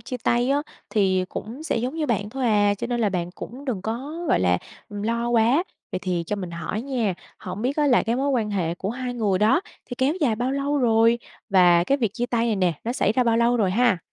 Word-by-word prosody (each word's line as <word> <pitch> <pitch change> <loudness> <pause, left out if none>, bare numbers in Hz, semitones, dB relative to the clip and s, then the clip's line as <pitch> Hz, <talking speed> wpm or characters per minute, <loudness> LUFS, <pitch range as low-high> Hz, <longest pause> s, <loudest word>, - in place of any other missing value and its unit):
chia 250 - -5
tay 240 +2 +2
á, 285 +1 +2 0.3
thì 190 -4 +2
cũng 235 +11 -7
sẽ 320 - -1
giống 250 +5 -2
như 320 -2 -1
bạn 210 -4 -1
thôi 265 +1 -3
à, 205 -2 +3
cho 200 - -4
nên 240 0 -1
là 215 - +3
bạn 175 -2 -2
cũng 250 +8 -9
đừng 230 -9 -3
có, 275 +10 -4
gọi - - +3
là, 90 -1 +3 0.3
ừm, 205 -1 -6
lo 235 +2 -1
quá. 240 +7 +3 0.3
Vậy - - -1
thì 180 -3 -1
cho 210 - -2
mình 185 -3 -5
hỏi 170 +6 -4
nha, 240 -8 -1 0.2
hổng 190 +4 -6
biết 270 +4 -1
á 300 - +2
là 255 -4 +4
cái 230 +2 0
mối 275 +2 0
quan 230 -5 0
hệ 175 -5 -1
của 195 +3 -4
hai 250 0 -4
người 205 -6 +1
đó 220 - +4 0.3
thì 245 - -6
kéo 270 +4 +2
dài 255 -8 +2
bao 245 +3 -1
lâu 280 +1 0
rồi? 230 -1 +4 0.3
Và 175 -3 +5
cái 275 +8 +1
việc 225 -6 0
chia 245 0 -1
tay 235 -1 0
này 220 -3 +1
nè, 180 -3 +2
nó 235 - -1
xảy 210 -5 +1
ra 250 +2 +2
bao 230 -1 +3
lâu 235 +1 +3
rồi 205 -5 +2
ha? 230 -1 +3
230 Hz, 260 wpm, -24 LUFS, 200-255 Hz, 0.3 s, Và